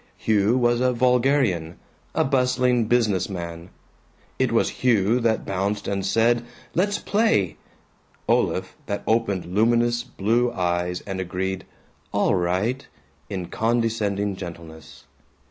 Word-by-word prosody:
Hugh 110 +2 +2
was 120 -1 +2
a 125 0 +2
vulgarian; 125 - +2 0.4
a - - +3
bustling 125 -3 +2
business 110 -5 +1
man. 85 -2 -6 0.7
It - - +2
was - - +2
Hugh 115 -1 +3
that 115 -2 0
bounced 100 +2 -2
and 100 -1 -1
said 115 +4 +2 0.3
"Let's 205 +4 +1
play"; 105 - +1 0.7
Olaf - - +1
that 100 - -3
opened 110 -5 +1
luminous 120 +3 +2
blue 120 +1 0
eyes 90 -2 -1
and 95 -1 -5
agreed 95 +1 -3 0.4
"All - - +2
right," 95 +8 0 0.4
in 95 -3 -4
condescending 110 -3 0
gentleness. 85 -3 -10
105 Hz, 115 wpm, -23 LUFS, 95-120 Hz, 0.7 s, a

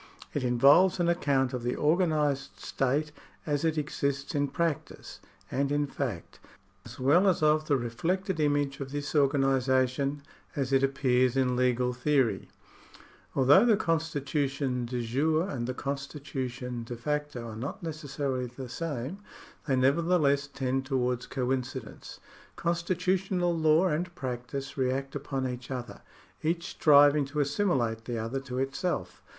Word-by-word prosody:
It 145 - -1
involves 140 +10 +5
an 175 - +2
account 140 -6 +1
of 125 - -3
the 120 +1 -2
organised 150 -4 +1
state 145 +4 -1 0.3
as 145 -1 -1
it 160 -1 +1
exists 140 -2 -2
in 145 -1 +1
practice 160 +2 -3 0.3
and 140 +1 0
in 145 0 +1
fact, 125 -10 -5 0.5
as - - -11
well 155 +10 +4
as 180 -4 +2
of 155 0 +3
the 145 - +3
110 125 - -1
THE 120 - -3
STATE 120 +9 -3
[§40 185 - +3
reflected 190 -3 -4
image 145 -2 +1
of 135 -1 -6
this 145 0 -4
organisation 135 -1 +2 0.3
as 135 -1 -1
it 135 - +5
appears 130 -2 +2
in 125 -1 +2
legal 125 0 +1
theor3\ 125 -5 +1 0.9
Although 140 - +6
the 230 -4 +4
constitution 145 - -1
de 120 0 -3
jure 155 +8 +1
and 120 -10 -3
the 130 - -3
constitution 135 -4 -4
de 120 +1 -6
facto 150 -1 -3
are 110 - -7
not 140 - -6
necessarily 140 -5 -3
the 125 +1 -9
same, 150 +4 -4 0.5
they 135 - +2
nevertheless 145 +1 +2
tend 135 -1 -2
towards 125 -2 -1
coincidence. 130 -2 -4 0.4
Constitutional 180 +1 0
law 160 +2 +4
and 175 +1 -1
practice 130 +1 -5
react 135 +1 -1
upon 135 -2 -2
each 125 0 -6
other, 125 -2 -6 0.4
each 170 +2 -1
striving 145 -1 +5
to 145 +2 -4
assimilate 135 - 0
the 120 -1 -3
other 115 +4 -2
to 130 -2 -6
it 135 +1 -1
self. 180 -5 -3
140 Hz, 150 wpm, -29 LUFS, 130-155 Hz, 0.9 s, Although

